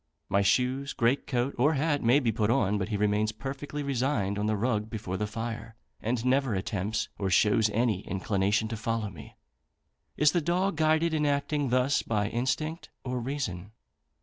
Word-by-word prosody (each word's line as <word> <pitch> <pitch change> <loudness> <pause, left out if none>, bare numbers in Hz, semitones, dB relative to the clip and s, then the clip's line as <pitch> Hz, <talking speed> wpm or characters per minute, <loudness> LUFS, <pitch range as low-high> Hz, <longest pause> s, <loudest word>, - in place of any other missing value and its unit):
My 100 - +3
shoes, 130 +6 +1
great 120 +4 +1
coat 125 0 0
or 150 +5 +4
hat, 145 +1 +1
may 120 +5 +5
be 120 -5 +1
put 110 -1 0
on, 105 -5 +2
but 95 - -2
he 105 - -1
remains 105 +1 +1
perfectly 140 +5 -5
resigned 125 -7 0
on 105 - 0
the 110 -1 +1
rug 110 -1 0
before 100 -5 -4
the 105 +3 -2
fire, 115 +1 -5 0.3
and 115 +1 -1
never 130 -3 +2
attempts 105 +3 -2
or 95 -2 0
shows 105 +3 +4
any 110 -2 +1
inclination 100 +2 0
to 110 - -4
follow 110 -1 -2
me. 80 -6 -12 0.8
Is 150 0 +5
the 175 - +1
dog 180 +4 0
guided 160 +1 +2
in 150 -1 +1
acting 145 0 0
thus 130 +3 +2
by 105 -2 -1
instinct 155 +8 -2
or 125 -1 -2
reason? 115 -7 -4
115 Hz, 175 wpm, -28 LUFS, 105-140 Hz, 0.8 s, may